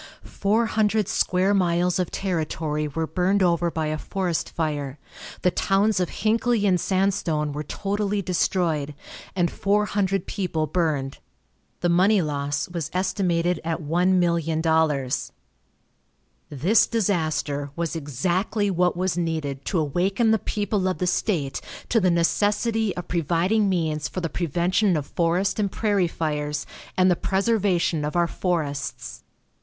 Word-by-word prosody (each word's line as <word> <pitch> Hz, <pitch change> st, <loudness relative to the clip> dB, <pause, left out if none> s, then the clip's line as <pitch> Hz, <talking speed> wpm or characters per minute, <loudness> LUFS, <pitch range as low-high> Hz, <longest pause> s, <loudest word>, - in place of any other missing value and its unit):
Four 215 Hz, +4 st, +1 dB
hundred 215 Hz, -2 st, +1 dB
square 185 Hz, +2 st, +2 dB
miles 180 Hz, -1 st, +2 dB
of 180 Hz, -, 0 dB
territory 155 Hz, -4 st, -2 dB
were 160 Hz, +3 st, -2 dB
burned 185 Hz, +5 st, +1 dB
over 170 Hz, -1 st, +2 dB
by 160 Hz, -1 st, -2 dB
a 155 Hz, 0 st, -2 dB
forest 180 Hz, -2 st, -2 dB
fire, 145 Hz, -4 st, -3 dB, 0.5 s
the 180 Hz, -, +4 dB
towns 195 Hz, +3 st, +2 dB
of 180 Hz, -, 0 dB
Hinckley 225 Hz, 0 st, +1 dB
and 185 Hz, -3 st, +3 dB
Sandstone 185 Hz, -6 st, 0 dB
were 150 Hz, -, -3 dB
totally 205 Hz, +6 st, -2 dB
destroyed, 165 Hz, -5 st, 0 dB, 0.4 s
and 175 Hz, -2 st, +1 dB
four 205 Hz, +1 st, +1 dB
hundred 195 Hz, -2 st, 0 dB
people 170 Hz, -6 st, -2 dB
burned. 150 Hz, -4 st, -1 dB, 0.6 s
The 175 Hz, -, +2 dB
money 190 Hz, +5 st, +4 dB
loss 145 Hz, -3 st, -2 dB
was 170 Hz, -3 st, -4 dB
estimated 180 Hz, -2 st, 0 dB
at 165 Hz, 0 st, -2 dB
$1,000,000. 160 Hz, -4 st, +1 dB, 1.2 s
This 170 Hz, -, +3 dB
disaster 155 Hz, -9 st, -1 dB
was 170 Hz, -1 st, -2 dB
exactly 180 Hz, -, -1 dB
what 180 Hz, -1 st, +1 dB
was 185 Hz, -1 st, 0 dB
needed 160 Hz, -5 st, -2 dB
to 190 Hz, -, -1 dB
awaken 185 Hz, -, +1 dB
the 220 Hz, -, +3 dB
people 205 Hz, -2 st, -1 dB
of 185 Hz, -, -1 dB
the 180 Hz, -, -1 dB
state 170 Hz, -6 st, -1 dB, 0.3 s
to 230 Hz, -, +3 dB
the 185 Hz, -3 st, +3 dB
necessity 205 Hz, +5 st, +1 dB
of 180 Hz, -, -5 dB
providing 175 Hz, +5 st, +1 dB
means 160 Hz, -5 st, 0 dB
for 185 Hz, -, -5 dB
the 165 Hz, -, -2 dB
prevention 175 Hz, +4 st, +1 dB
of 145 Hz, -, -3 dB
forest 175 Hz, +7 st, 0 dB
and 200 Hz, -2 st, 0 dB
prairie 205 Hz, -5 st, +1 dB
fires 150 Hz, -2 st, -2 dB, 0.3 s
and 185 Hz, 0 st, +5 dB
the -, -, +4 dB
preservation 190 Hz, -5 st, +1 dB
of 150 Hz, +2 st, -3 dB
our 175 Hz, 0 st, +3 dB
forests. 155 Hz, -6 st, -3 dB
175 Hz, 140 wpm, -24 LUFS, 155-195 Hz, 1.2 s, and